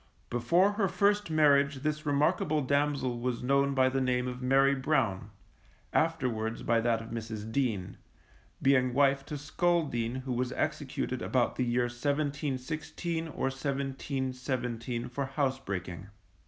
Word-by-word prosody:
Before 170 - +3
her 205 -1 +1
first 205 +1 +2
marriage 140 -3 +3
this 155 0 -2
remarkable 150 +2 +2
damsel 140 -3 0
was 125 0 -2
known 140 +1 +2
by 130 -1 +4
the 135 +1 0
name 125 -1 +1
of 125 0 -5
Mary 135 +2 +4
Brown, 130 -8 0 0.6
afterwards 125 -9 0
by 115 0 +2
that 115 -1 +1
of 115 - -10
Mrs. 110 -1 -5
Dean, 110 -8 -1 0.7
being 130 -2 +3
wife 140 0 +3
to 150 - -4
Skull 170 +4 +1
Dean 120 -3 -2
who 130 -1 -3
was 125 +1 -1
executed - - -2
about - - +1
the 125 - 0
year 120 +1 +1
1716 145 +5 -2
or 155 - -8
1717 130 -3 -3
for 135 +2 -3
housebreaking. 130 - -3
135 Hz, 135 wpm, -30 LUFS, 120-145 Hz, 0.7 s, by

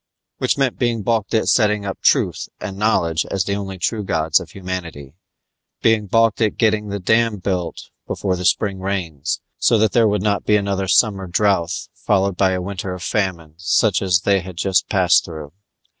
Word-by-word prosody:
Which - - +1
meant 135 -3 0
being 120 -3 0
balked 110 -1 0
at 110 - +1
setting 105 -3 +2
up 95 - -5
Truth - - +1
and 95 +1 -6
Knowledge 90 -6 +1
as 95 -2 0
the 100 - -2
only 100 -1 -5
true 105 +4 -2
gods 80 -4 +1
of - - -10
humanity, 85 -7 -7 0.7
being 110 -2 +2
balked 115 +2 +2
at 110 -2 +1
getting 110 -2 +1
the 100 - -3
dam 110 +3 +1
built 90 -3 -4 0.2
before 95 -2 -2
the 90 - -5
spring 100 +1 +1
rains, 90 -5 -3 0.2
so 115 - +3
that 110 -1 +2
there 115 -2 +4
would 105 -2 0
not 100 -1 0
be 105 - +2
another 100 -2 -1
summer 95 0 +2
drouth 85 -3 0
followed 100 -2 0
by 95 0 +2
a 90 - -2
winter 95 -1 -5
of 90 - -9
famine 90 -8 -2
such 90 +5 +2
as 90 -3 +2
they 100 +1 +2
had 90 -1 -9
just 95 0 +1
passed 90 -3 +4
through. 80 -3 -9
95 Hz, 190 wpm, -20 LUFS, 90-105 Hz, 0.7 s, there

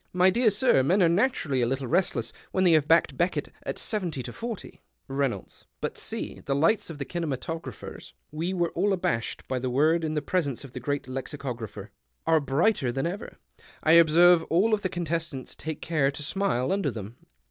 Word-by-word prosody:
— - - -40
" - - -45
My 190 - +7
dear 235 +3 +4
sir, 210 - +4
men 180 +9 +3
arc 165 - +4
naturally 170 - +1
a 120 - +2
little 135 +2 -2
restless, 175 +9 0 0.2
when 185 - +1
they 180 - +5
have 155 -2 +4
backed 165 +1 +4
Beckett 175 +2 0
at - - -4
70 175 - -2
to - - -6
•iO." 230 -3 -7 0.3
Reynolds. 135 -7 -3
— - - -52
" - - -51
But, - - -3
see, - - -5
the 135 - -1
lights 165 +9 +2
of 165 - -7
the 140 - -4
kinematographers 160 - -5
" - - -47
(we 165 +4 -2
were 175 -3 0
all 195 +3 +1
abashed 115 - -2
by 130 - -1
the 130 0 -2
word 155 +6 +3
in 155 -1 -2
the 150 - -1
presence 145 -8 -1
of 135 - -10
the - - -5
Great 145 +3 -2
Lexicographer) 125 -6 -6 0.2
" - - -49
arc 160 -3 +2
brighter 140 - +2
than 135 +4 -2
ever. 190 +6 -5 0.5
I 160 - +4
observe 170 +1 +7
all 210 +7 +3
the 205 -3 -3
con 175 -1 -3
testants 165 -4 -4
take 160 -1 -6
care 150 -4 +2
to 140 +2 -5
smile 155 -5 0
under 195 -6 +1
them." 115 -1 -7
160 Hz, 215 wpm, -27 LUFS, 135-180 Hz, 0.5 s, My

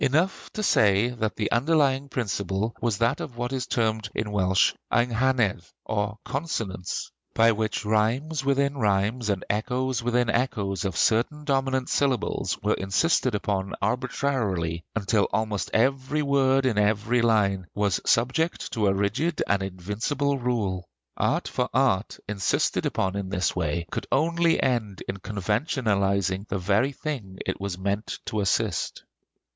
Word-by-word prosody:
Enough 155 +8 +1
to 215 - -3
say 105 - +4
that 110 -3 -2
the 105 - -2
underlying 140 +1 +2
principle 100 -2 -2
was 115 -4 0
that 115 0 +1
of 120 - -7
what 120 +2 -2
is 130 -2 -2
termed 110 -2 0
in 105 -1 -2
Welsh 95 -2 +3 0.2
"Eynghanedd," 120 -4 +2 0.2
or 105 0 -1
"consonancy"; 115 - -3 0.2
by 115 +1 +6
which 110 -1 -2
rhymes 120 +8 +1
within 140 0 +1
rhymes 105 +2 +1
and 100 -2 -1
echoes 125 +4 -1
within 120 +1 +1
echoes 100 -7 -1
of 95 -5 -2
certain 120 +7 +2
dominant 135 -2 0
syllables 135 -5 0
were - - +3
insisted 115 - +1
upon 100 -2 -2
arbitrarily, 110 -8 -1
until 105 -1 +2
almost 105 -1 -1
every 135 +5 +1
word 135 -1 +3
in 115 -5 +2
every 110 +3 +2
line 100 -5 +2
was 100 -2 +1
subject 130 +9 +1
to 105 -3 +1
a 95 - +3
rigid 145 +12 0
and 100 -1 +1
invincible 105 - -2
rule. 105 -8 -1 0.3
Art - - 0
for 125 0 -1
art, 125 -7 +2
insisted 105 -2 0
upon 95 0 -1
in 100 -2 -3
this 90 -2 0
way, 85 -1 -1
could - - -4
only 165 +3 +2
end 110 -7 -1
in 95 - -3
conventionalizing 100 - 0
the 100 - -2
very 100 +9 +2
thing 125 -10 -5
it 95 - -3
was 100 -3 -3
meant 100 +3 -2
to 110 - -2
assist. 100 - 0
110 Hz, 145 wpm, -26 LUFS, 100-130 Hz, 0.3 s, by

